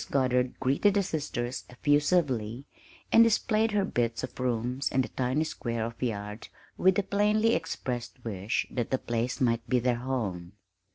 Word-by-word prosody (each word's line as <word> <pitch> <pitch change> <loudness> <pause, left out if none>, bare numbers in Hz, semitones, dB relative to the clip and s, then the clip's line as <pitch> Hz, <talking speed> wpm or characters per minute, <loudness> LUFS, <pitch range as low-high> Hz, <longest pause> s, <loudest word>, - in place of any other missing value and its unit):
Goddard 125 -2 +1
greeted 140 +10 +2
the 200 - +3
sisters 140 -8 -3
effusively, 140 -4 +1 0.5
and 230 - +8
displayed 225 0 +2
her 200 -2 +2
bits 115 -5 -1
of 130 - -7
rooms 125 +1 -1
and 130 0 +2
the - - -6
tiny 130 +4 0
square 115 -7 -3
of 115 0 -8
yard 105 -3 -3 0.3
with 190 0 +4
the 205 - +2
plainly 210 +3 +2
expressed 125 -7 -3
wish 100 -1 -1
that 120 -3 -2
the 130 - +1
place 120 0 -2
might 115 -2 +1
be 125 - +3
their 125 0 +1
home. 105 -9 -3
125 Hz, 160 wpm, -28 LUFS, 115-155 Hz, 0.5 s, and